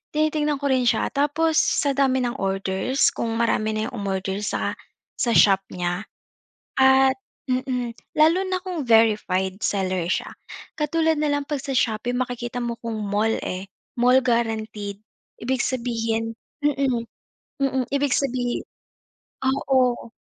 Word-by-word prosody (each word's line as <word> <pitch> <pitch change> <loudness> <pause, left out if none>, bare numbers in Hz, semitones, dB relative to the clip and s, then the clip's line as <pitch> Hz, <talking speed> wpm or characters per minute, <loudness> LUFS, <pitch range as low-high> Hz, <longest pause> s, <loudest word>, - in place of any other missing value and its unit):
tinitingnan 300 -1 +1
ko 285 - 0
rin 260 -1 +3
siya 225 - +2
tapos 300 +3 +1
sa 285 - +2
dami 260 -2 +3
ng 240 +1 -1
orders 195 +6 +1
kung 230 -1 -2
marami 220 -2 +1
na 215 +1 -1
'yung - - -9
umorder 195 -1 -2
sa - - -1 0.4
sa 240 - +1
shop 195 -2 +6
niya. 180 +2 -2 0.8
At 265 0 +6 0.3
mm, 255 -2 -1 0.2
lalo 320 +4 +5
na 370 0 -1
kung 355 -7 -4
verified 210 -4 +3
seller 185 -3 0
siya - - -1 0.5
katulad 320 +1 +1
na 300 -1 +1
lang 285 0 0
'pag 295 - 0
sa 270 0 -4
Shopee 235 0 0
makikita 245 0 -3
mo 235 -1 -3
kung 230 -2 -4
mall, 210 +2 +1
eh, 185 +2 -5 0.3
mall 250 +2 +6
guaranteed, 220 -4 -1 0.4
ibig 255 +1 0
sabihin 225 -2 -1 0.3
mm, 270 -5 +1 0.6
mm, 265 -2 +1
ibig 280 -2 +2
sabihin 250 -3 -1 0.8
oo. 260 -3 +1
245 Hz, 135 wpm, -23 LUFS, 215-275 Hz, 0.8 s, shop